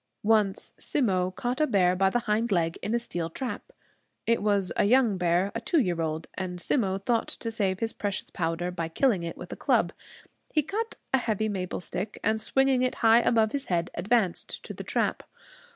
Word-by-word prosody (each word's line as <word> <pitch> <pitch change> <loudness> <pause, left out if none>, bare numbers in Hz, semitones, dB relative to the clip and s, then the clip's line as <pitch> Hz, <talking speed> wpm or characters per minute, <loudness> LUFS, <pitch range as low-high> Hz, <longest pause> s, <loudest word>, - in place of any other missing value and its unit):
Once 210 -2 +2
Simmo 185 -10 +1
caught 245 +9 -3
a 305 - +4
bear 185 -6 +3
by 190 +1 +3
the 240 +5 0
hind 220 +1 0
leg 165 -3 +1
in 220 - -1
a - - +4
steel 175 -8 -3
trap. 260 +6 -5 0.5
It 230 0 +2
was 200 -3 +1
a - - +3
young 230 -3 +4
bear, 180 +3 +2
a 230 - -3
two 325 +7 +2
year 175 - 0
old; 160 0 -2
and 180 -2 -4
Simmo 195 -1 +1
thought 230 +4 0
to 230 - -4
save 195 -4 -1
his 225 0 -1
precious 200 -2 -3
powder 165 +1 -2
by 170 -2 -3
killing 200 +3 +2
it 170 0 -5
with - - -7
a - - -6
club. - - +1 0.6
He 305 - +2
cut 440 +8 -3 0.2
a 265 - +5
heavy 220 -2 -1
maple 185 -3 -3
stick 195 +3 -4
and, 220 0 +1
swinging 270 +2 +2
it 255 0 +1
high 225 +1 +8
above 225 -2 +3
his 280 -1 -3
head, 175 -1 0
advanced 195 0 0
to - - -7
the - - -7
trap. - - 0
205 Hz, 200 wpm, -27 LUFS, 180-235 Hz, 0.6 s, high